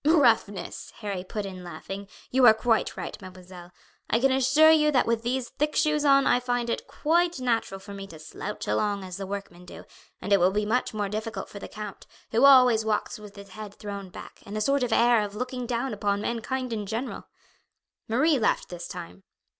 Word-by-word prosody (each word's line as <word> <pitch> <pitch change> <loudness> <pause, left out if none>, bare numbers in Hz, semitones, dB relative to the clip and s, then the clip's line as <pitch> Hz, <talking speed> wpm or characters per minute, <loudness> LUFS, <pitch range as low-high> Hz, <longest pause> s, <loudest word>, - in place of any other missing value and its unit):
"Roughness," 235 - +2
Harry 200 -4 -3
put 205 +2 -5
in 185 -2 -8
laughing. 195 +4 -7 0.2
"You 255 -1 +6
are 220 - +8
quite 225 0 0
right, - - -5
mademoiselle. 180 -1 -12 0.4
I 230 - +3
can 270 +2 +3
assure 270 +4 +5
you 305 -1 +4
that 270 -4 +3
with 230 -1 0
these 240 +1 -2
thick 300 +1 -2
shoes 300 -1 +2
on 275 -1 +5
I 245 - +4
find 245 -1 -1
it - - -3
quite 340 0 +1
natural 230 -6 -1
for 200 +1 -10
me 195 0 -7
to 165 - -11
slouch 160 +6 -7
along 205 -2 0
as 185 -1 -7
the 195 -1 -5
workmen 195 -3 -7
do; 180 - -11 0.3
and 200 - -1
it 200 - +5
will 180 +1 +5
be 210 +2 -1
much 240 +4 0
more 205 -1 -1
difficult 215 +2 -5
for 200 - -9
the - - -7
count, 210 -2 -8 0.2
who 235 +5 +4
always 250 -5 +7
walks 215 0 -2
with 210 -1 -12
his 200 -1 -11
head 210 +1 -9
thrown 200 -2 -7
back, - - -11
and 205 +2 -6
a - - -1
sort 275 +5 +2
of 245 -2 -1
air 235 0 +4
of 205 -1 -5
looking 250 +1 -4
down 245 +1 -2
upon 200 -1 0
mankind 245 +2 -3
in 210 -2 -4
general." 225 +6 -4 0.8
Marie 275 +6 +3
laughed 220 - +1
this 175 -1 -7
time. 90 +3 -9
220 Hz, 210 wpm, -26 LUFS, 200-255 Hz, 0.8 s, are